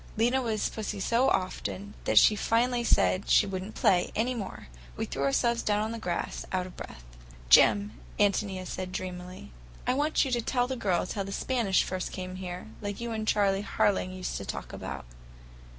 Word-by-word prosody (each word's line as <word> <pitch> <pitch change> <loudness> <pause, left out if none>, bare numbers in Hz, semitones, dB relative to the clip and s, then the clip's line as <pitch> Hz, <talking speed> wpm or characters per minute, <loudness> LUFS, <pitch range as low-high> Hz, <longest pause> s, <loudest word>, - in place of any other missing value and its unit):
Lena 245 +4 +3
was 220 -4 0
Pussy 215 -2 -4
so 235 +6 +2
often 190 +2 -2
that - - +1
she 215 - +8
finally 240 +3 +1
said 200 -4 +2
she - - +6
would 190 -2 -3
n't 210 +3 -9
play 180 -2 +3
any 240 +4 +1
more. 215 -6 -6 0.3
We - - -1
threw 135 - -5
ourselves 235 - +2
down 210 0 +1
on 220 - -3
the 230 - -5
grass, 175 -5 -3
out 185 -1 0
of 185 - -11
breath. - - -9 0.5
"Jim," 205 - +6 0.3
Ántonia 200 -2 +1
said 185 0 -5
dreamily, 180 - -6 0.3
"I 250 - +2
want 295 +3 +2
you 265 - -3
to 240 -1 +1
tell 245 +1 +1
the 260 +1 -3
girls 185 -7 0
about - - -3
how - - +1
the 195 - -6
Spanish 225 -3 +1
first 185 -1 -4
came 185 0 -6
here, 180 -1 -6 0.2
like 205 -1 -4
you 235 0 -4
and 220 -1 -3
Charley 200 -2 +2
Harling 200 -2 +1
used 185 0 -4
to - - -5
talk - - -6
about. - - -6
205 Hz, 200 wpm, -29 LUFS, 185-230 Hz, 0.5 s, she